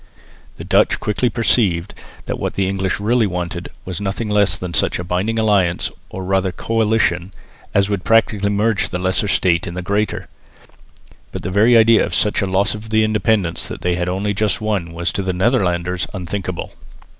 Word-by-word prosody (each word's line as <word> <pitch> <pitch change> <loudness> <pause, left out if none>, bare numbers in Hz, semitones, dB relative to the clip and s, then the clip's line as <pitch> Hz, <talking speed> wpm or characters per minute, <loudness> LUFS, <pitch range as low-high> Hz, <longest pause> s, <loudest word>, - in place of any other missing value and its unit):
The - - -9
Dutch - - +2
quickly 105 +4 0
perceived 105 -6 +1 0.3
that - - -4
what - - -3
the 95 -1 +1
English 95 -1 -1
really 115 +2 +2
wanted 90 -1 -4 0.2
was 95 +1 -4
nothing 100 +3 -3
less 100 -6 +2
than 90 -2 -6
such - - +1
a 90 - -4
binding 90 +6 -1
alliance 100 -6 +1 0.2
or 95 - -6
rather 95 0 0
coalition 105 -3 0 0.4
as 100 -1 +4
would 100 -3 -2
practically 105 0 +2
merge 105 +1 +1
the 90 - -3
lesser 95 +3 0
state 90 -3 +2
in 85 - -6
the 90 - -4
greater. 100 +3 -1 1.0
But - - -6
the 90 - -3
very 110 +5 +5
idea 115 0 +5
of - - -2
such 105 0 +1
a 100 - 0
loss 95 +2 +1
of 110 +1 -9
the 110 0 +3
independence 105 -5 0
that - - -7
they 90 - 0
had 90 0 -1
only 100 +3 -1
just 105 +1 0
won 100 -6 -2
was 85 +1 -2
to - - -2
the 95 -1 -2
Netherlanders 90 -4 0
unthinkable. 90 -1 -4
100 Hz, 185 wpm, -19 LUFS, 90-110 Hz, 1.0 s, very